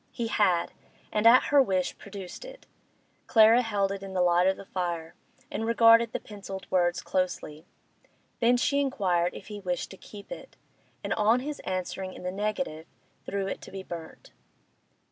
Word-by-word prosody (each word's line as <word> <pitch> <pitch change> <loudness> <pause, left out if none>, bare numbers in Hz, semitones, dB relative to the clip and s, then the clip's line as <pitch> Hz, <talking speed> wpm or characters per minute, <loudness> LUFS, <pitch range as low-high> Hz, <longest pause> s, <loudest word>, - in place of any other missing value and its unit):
He 230 -1 -3
had, 185 -6 +2 0.4
and 215 +1 +3
at 245 +2 +8
her 285 - +8
wish 190 -7 0
produced 195 -3 -9
it. - - -12 0.6
Clara 225 +2 +6
held 205 -4 0
it 195 -1 -5
in 195 -1 -8
the 180 - +2
light 175 +1 +4
of 190 - +2
the 200 - -10
fire, 170 -4 -3 0.4
and 225 - -3
regarded 230 0 +5
the - - -3
pencilled 195 -2 -8
words 175 -1 +1
closely. 180 -3 -3 0.7
Then 245 +1 +4
she 280 +3 +1
inquired 185 -11 0
if - - -9
he 210 0 -7
wished 180 -3 -3
to 190 - -11
keep 200 +1 -13
it, - - -9 0.5
and - - -1
on 225 +3 +3
his 295 +2 -5
answering 185 0 -4
in - - -10
the 180 - -2
negative 205 - -3 0.4
threw 200 0 -2
it 195 - -4
to - - -11
be 190 0 -7
burnt. 170 -3 -9
195 Hz, 175 wpm, -28 LUFS, 180-225 Hz, 0.7 s, at